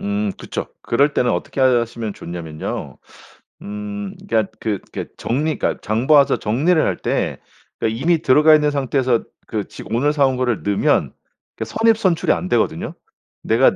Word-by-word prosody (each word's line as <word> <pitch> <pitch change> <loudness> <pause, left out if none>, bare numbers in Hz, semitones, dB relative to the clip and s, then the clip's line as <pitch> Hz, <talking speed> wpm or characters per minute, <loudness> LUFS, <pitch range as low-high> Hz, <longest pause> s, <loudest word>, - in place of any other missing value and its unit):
음 100 0 -1
그쵸. - - -5 0.2
그럴 140 +5 +2
때는 125 - +2
어떻게 90 +9 -3
하시면 115 -4 +1
좋냐면요. 80 -3 -6 0.6
음 105 -1 -6
그러니까 110 -3 +1
그 105 -3 -1
그러니까 - - -6
정리 150 +6 -1
그러니까 - - -1
장 110 +4 -1
봐서 145 -3 +5
정리를 155 +10 +2
할 - - 0
때 - - -1 0.4
그 - - +1
이미 150 +9 +1
들어가 155 +2 +6
있는 150 -1 +1
상태에서 130 -3 +1 0.2
그 105 -2 -3
지 - - -10
오늘 130 +7 +2
사 145 -2 +3
온 130 -1 0
거를 125 -3 0
넣으면 100 -1 +1 0.4
그 110 - -3
선입선출이 215 - +2
안 180 - -2
되거든요. 120 -7 0 0.5
내가 115 +4 +4
120 Hz, 335 characters per minute, -20 LUFS, 105-145 Hz, 0.6 s, 들어가